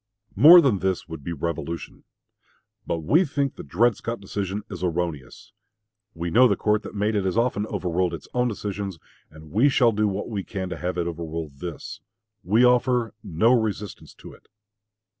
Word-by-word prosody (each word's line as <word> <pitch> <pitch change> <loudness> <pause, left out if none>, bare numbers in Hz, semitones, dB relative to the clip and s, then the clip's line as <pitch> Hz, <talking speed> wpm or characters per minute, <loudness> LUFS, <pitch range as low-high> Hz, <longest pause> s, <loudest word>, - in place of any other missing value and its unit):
More 160 - +9
than 125 - +2
this 95 0 -1
would 80 -4 -8
be 85 - -5
revolution. 85 +1 -5 0.8
But 85 - -2
we 160 - +4
think 140 -3 -2
the - - -8
Dred 110 - +2
Scott 115 +3 -5
decision 100 +1 -4
is 95 -3 -8
erroneous. 85 -5 -4 0.6
We 85 +1 -4
know 125 +6 +6
the 100 - +1
court 105 +1 +1
that - - -10
made 105 +2 0
it 100 -2 0
has 95 +2 -1
often 115 -3 0
overruled 90 -4 -1
its - - -12
own 125 0 +1
decisions, 100 -4 -4 0.3
and 80 0 -14
we 120 +9 +4
shall 125 -3 +4
do 105 0 +1
what 100 0 -3
we 105 -4 -4
can 95 -2 -5
to - - -5
have 90 0 -3
it 85 - 0
overrule 80 -1 -5
this. 80 +3 -8 0.4
We 110 +6 +3
offer 125 -2 +2
no 105 +4 +2
resistance 105 -4 -3
to - - -12
it. - - -20
100 Hz, 180 wpm, -24 LUFS, 85-115 Hz, 0.8 s, More